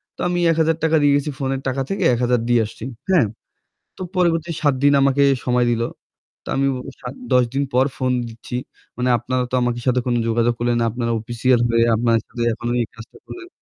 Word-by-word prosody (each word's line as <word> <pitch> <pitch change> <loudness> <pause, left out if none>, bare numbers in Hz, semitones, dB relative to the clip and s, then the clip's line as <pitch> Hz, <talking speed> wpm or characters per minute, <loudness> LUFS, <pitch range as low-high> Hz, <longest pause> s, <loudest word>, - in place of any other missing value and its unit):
তো - - -31
আমি 175 0 0
৳১,০০০ 160 0 +1
দিয়ে 145 -1 +4
গেছি, 145 +1 0
ফোন 135 -1 -2
এর 135 - -5
টাকা 130 +1 -1
থেকে 195 0 -2
১,০০০ 125 0 +1
দিয়ে 120 -1 +4
আসছি, 105 - -10 0.3
হ্যাঁ। 175 -10 +4 0.7
তো - - -10
পরবর্তীতে 170 -2 +1
৭ 145 -3 +3
দিন 145 0 +5
আমাকে 140 +1 +3 0.2
সময় 125 -1 +2
দিল। 115 -1 0 0.6
তো - - -21
আমি 135 - +2
ও - - -5 0.2
সা - - -7 0.3
১০ 125 0 +5
দিন 140 +1 +1
পর 130 +1 +4
ফোন 130 0 0 0.2
দিচ্ছি, 115 +2 -8 0.4
"মানে 125 0 0
আপনারা 130 +2 -2
তো - - 0
আমাদের 120 0 -1
সাথে 125 0 +3
কোনো 120 -1 +1
যোগাযোগ 115 +1 +2
করলেন 120 0 +1
না। 115 - +2
আপনারা 115 0 -2
অফিসিয়াল 120 +2 +1
হয়ে 115 0 +3
আপনারা 115 0 +2
যদি 120 - -6
এখনো 120 +1 -3
এই 115 - -2
কাজটা 115 0 -13
করেন।" 355 -1 -9
125 Hz, 205 wpm, -21 LUFS, 120-145 Hz, 0.7 s, দিন